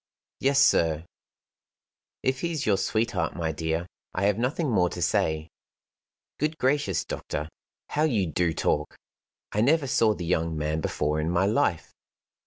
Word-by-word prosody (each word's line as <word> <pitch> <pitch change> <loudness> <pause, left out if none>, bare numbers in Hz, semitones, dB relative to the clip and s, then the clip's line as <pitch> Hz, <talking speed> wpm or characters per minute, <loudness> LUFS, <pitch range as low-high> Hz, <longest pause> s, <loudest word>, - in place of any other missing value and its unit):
"Yes, 140 +1 +3
sir. 80 - +3 1.2
"If 130 0 0
he's 165 -4 -2
your 100 -3 +3
sweetheart, 110 -8 0
my 80 -2 -1
dear, 80 +2 -2 0.3
I 90 - -1
have 100 +1 +2
nothing 140 +6 0
more 90 -5 +3
to 90 - -7
say." 80 -1 +1 0.9
"Good 155 +2 0
gracious, 130 - +1
doctor, 75 +1 -4 0.4
how 150 +1 +1
you 110 -11 +1
do 85 +1 0
talk! 75 -1 -1 0.6
I 105 - +1
never 145 +5 +3
saw 110 -4 +3
the 90 - -5
young 80 -2 0
man 75 +1 -1
before 75 0 -1
in 80 - -1
my 90 +2 +2
life." 105 - +1
95 Hz, 150 wpm, -26 LUFS, 80-130 Hz, 1.2 s, Yes